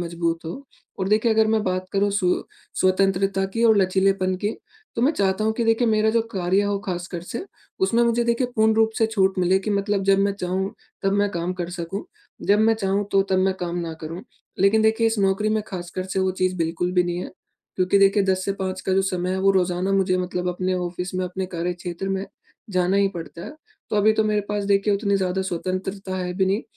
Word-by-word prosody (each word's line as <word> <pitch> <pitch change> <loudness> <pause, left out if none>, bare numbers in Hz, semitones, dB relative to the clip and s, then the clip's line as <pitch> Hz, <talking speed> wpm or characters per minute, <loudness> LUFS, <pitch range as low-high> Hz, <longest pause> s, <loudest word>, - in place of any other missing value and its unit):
मजबूत 170 -1 -2
हो 160 - -4 0.5
और 190 0 -1
देखिए 220 +2 +3
अगर 220 0 +4
मैं 215 - +1
बात 185 0 -1
करूँ 200 +1 +2
सु 200 -2 0 0.5
स्वतंत्रता 195 +1 +2
की 230 +1 +1
और 220 -2 +6
लचीलेपन 190 0 +2
की 205 - +2 0.5
तो 235 - 0
मैं 290 +5 +4
चाहता 195 -2 0
हूँ 220 - +2
कि 235 +1 -1
देखिए 225 +1 +2
मेरा 215 0 +3
जो 230 0 +2
कार्य 190 +1 +1
हो 200 0 0
ख़ास 175 -1 -3
कर 170 - -3
से 235 - -4 0.4
उसमें 235 +1 +2
मुझे 235 0 +2
देखिए 235 +2 +1
पूर्ण 220 0 +4
रूप 220 0 +3
से 225 - +4
छूट 190 -4 +1
मिले 185 +1 +3
कि 210 +2 -4
मतलब 200 0 0
जब 195 0 +4
मैं 200 0 +2
चाहूँ 190 0 -2 0.3
तब 195 0 +1
मैं 205 0 +2
काम 175 0 -2
कर 170 - -5
सकूँ 170 +5 -4 0.4
जब 205 +1 +5
मैं 225 +1 +4
चाहूँ 200 -1 0
तो 195 0 +5
तब 185 - +3
मैं 190 0 +2
काम 175 0 -3
ना 165 -1 -3
करूँ। 165 +4 -6 0.4
लेकिन 200 +3 +4
देखिए 220 +1 +3
इस 225 -1 0
नौकरी 195 +2 +2
में - - -3
ख़ास 175 -3 -6
कर 185 - -1
से 190 0 -3
वो 190 0 +2
चीज़ 185 0 -1
बिल्कुल 170 +2 -1
भी 180 -1 +4
नहीं 175 0 -2
है, - - -5 0.5
क्योंकि 185 +2 +3
देखिए 195 +1 +4
10 185 -1 +1
से 195 - 0
5 185 0 -3
का 190 - -2
जो 195 0 +3
समय 185 -1 -1
है 190 - -1
वो 195 - +4
रोज़ाना 185 +1 +1
मुझे 190 -1 +2
मतलब 180 0 -2
अपने 185 +1 -1
ऑफ़िस 180 +1 -4
में, 185 0 -1
अपने 185 +1 -4
कार्यक्षेत्र 175 +1 -4
में 195 +1 -2 0.4
जाना 185 +1 +1
ही 200 -1 +3
पड़ता 170 -2 -8
है, - - -7 0.4
तो 210 - 0
अभी 215 +1 +5
तो 220 0 +1
मेरे 210 -1 +1
पास 205 -1 -1
देखिए 200 +1 +2
उतनी 200 0 +1
ज़्यादा 190 0 -1
स्वतंत्रता 185 +2 -3
है 180 -1 -3
भी 190 0 +1
नहीं 200 +4 0
190 Hz, 230 wpm, -23 LUFS, 180-205 Hz, 0.5 s, और